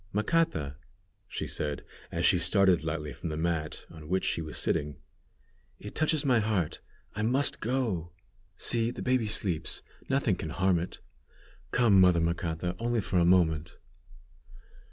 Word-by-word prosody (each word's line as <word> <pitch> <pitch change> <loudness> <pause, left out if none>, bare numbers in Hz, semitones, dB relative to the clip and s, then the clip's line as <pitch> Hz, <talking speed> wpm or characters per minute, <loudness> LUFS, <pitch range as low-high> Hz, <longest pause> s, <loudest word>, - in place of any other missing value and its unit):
"Macata," 105 - 0 0.5
she - - -4
said, 75 -1 -3 0.3
as - - 0
she - - +5
started 95 -5 +4
lightly 75 -2 -3
from 85 - -6
the 75 - -3
mat 80 -2 -2
on 80 -2 -11
which 95 +1 +1
she - - 0
was 80 -1 -6
sitting, 75 0 -1 0.8
"it 105 - -9
touches 155 -1 +1
my 125 -4 +4
heart; 105 -7 -1 0.3
I 105 - -2
must 130 +6 +1
go! 110 -9 -1 0.5
See, 115 -1 +1
the - - -6
baby 130 -3 +1
sleeps. 95 -6 -1 0.3
Nothing 135 -7 +2
can 80 - -5
harm 90 +1 +2
it. 90 +2 -6 0.7
Come, 110 -6 +5
mother 90 -2 +5
Macata, 85 +1 -1
only 120 0 0
for 95 -3 0
a 85 - +4
moment!" 85 -2 +2
90 Hz, 150 wpm, -29 LUFS, 80-115 Hz, 0.8 s, she